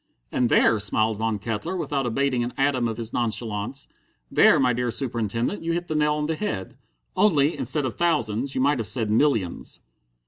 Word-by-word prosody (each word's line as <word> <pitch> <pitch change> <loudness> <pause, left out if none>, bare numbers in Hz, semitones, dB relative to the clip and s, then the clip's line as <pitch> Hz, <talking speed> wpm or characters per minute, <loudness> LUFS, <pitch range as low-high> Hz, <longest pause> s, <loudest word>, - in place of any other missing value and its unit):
"And 125 -2 +1
there," 110 - +4
smiled 110 +1 0
Von 110 0 -1
Kettler, 110 - -4
without 140 -6 -2
abating 130 0 0
an 120 - -5
atom 135 -3 +1
of 110 -1 -4
his 115 -1 -4
nonchalance, 115 +1 -2 0.4
"there, - - +5
my 125 -2 +3
dear 125 +1 -1
Superintendent, 115 - -1
you 165 0 -1
hit 175 +1 -2
the 160 - -4
nail 150 0 +2
on 150 0 -2
the 160 - -1
head. 155 - -4 0.4
Only, 155 -7 +3
instead 150 -3 -2
of 125 - -3
thousands, 140 -7 0
you - - 0
might 140 0 +2
have 110 - -2
said 110 -4 +2
millions." 110 - 0
125 Hz, 185 wpm, -24 LUFS, 110-145 Hz, 0.4 s, there